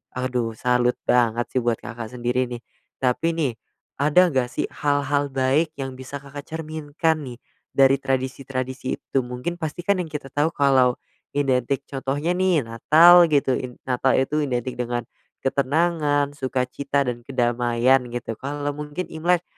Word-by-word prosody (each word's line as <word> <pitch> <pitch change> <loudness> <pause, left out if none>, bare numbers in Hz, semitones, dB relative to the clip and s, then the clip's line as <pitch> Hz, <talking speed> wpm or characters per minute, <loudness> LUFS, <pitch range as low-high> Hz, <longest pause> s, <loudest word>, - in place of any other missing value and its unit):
Aduh, 125 -3 -2
salut 125 +1 +2
banget 120 -1 +2
sih 130 - +1
buat 120 -1 +1
Kakak 120 0 -7
sendiri 125 +1 0
nih, 120 -1 -7 0.4
tapi 165 +6 +1
nih, 150 -6 0 0.5
ada 170 +5 +4
nggak 130 -3 +1
sih - - -3
hal-hal 145 0 0
baik 135 +4 +1
yang 135 -2 -5
bisa 140 +2 -7
Kakak 140 +1 -9
cerminkan 155 0 -2
nih 120 -1 -9 0.4
dari 135 0 +5
tradisi-tradisi 130 0 -3
itu, 135 - -1
mungkin 125 +8 -4
pasti 160 +2 -4
kan 200 0 +2
yang 175 - -2
kita 140 -3 -6
tahu 145 +3 +2
kalau 130 -3 +4 0.4
identik, 135 -1 +1
contohnya 140 +4 -1
nih 180 -5 +2
Natal 165 +10 +6
gitu, 145 -4 +2
in 125 -1 -6
Natal 130 +1 +2
itu 140 +3 +1
identik 125 -2 -3
dengan 120 0 -2 0.4
ketenangan, 145 +1 +1
sukacita, 135 +1 -1
dan 125 -2 -3
kedamaian 120 0 +2
gitu, 120 -1 -5
kalau 145 +1 -3
mungkin 150 +4 -6
Imlek, 170 +2 +1
135 Hz, 145 wpm, -23 LUFS, 125-150 Hz, 0.5 s, Natal